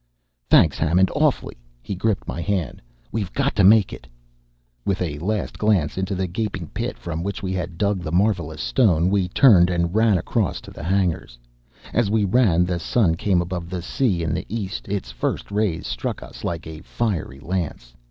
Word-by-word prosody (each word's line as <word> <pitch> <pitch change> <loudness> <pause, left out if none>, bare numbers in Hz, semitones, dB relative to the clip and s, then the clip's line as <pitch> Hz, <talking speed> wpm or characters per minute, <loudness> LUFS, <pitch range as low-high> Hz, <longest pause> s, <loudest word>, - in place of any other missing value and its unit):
"Thanks, - - +5
Hammond. 90 +4 +3
Awfully!" - - +1 0.3
He - - -4
gripped 100 +2 -1
my 85 - -4
hand. 90 -6 -2 0.3
"We've 100 -6 -3
got 140 0 0
to 100 - +3
make 105 0 +6
it!" - - -10 0.8
With 95 +4 -1
a 75 -5 -3
last 105 +4 -2
glance 100 -8 +2
into 95 +1 -2
the 95 0 -1
gaping 95 -3 -4
pit - - -4
from 80 -1 -5
which 100 +2 -4
we 95 -1 -2
had 90 -2 -4
dug 100 0 0
the 80 - -5
marvelous 85 -4 0
stone, 90 - +3
we 100 -3 +2
turned 90 -3 +6
and 85 -1 0
ran 110 -2 +4
across 95 +2 -1
to - - -12
the - - -10
hangars. 90 -7 -1 0.6
As 115 -3 +2
we 105 -1 +2
ran 95 -5 +3
the 90 -1 -2
sun 90 0 +2
came 90 +1 +1
above 85 -1 -5
the 90 -2 -4
sea 95 -5 0
in 80 -2 -1
the - - -3
east: 100 -3 -4
its 100 -1 -3
first - - -3
rays 100 -5 0
struck - - -4
us - - -12
like 85 -1 -3
a 80 -1 -8
fiery 90 - -3
lance. 75 -7 -4
95 Hz, 190 wpm, -22 LUFS, 85-105 Hz, 0.8 s, make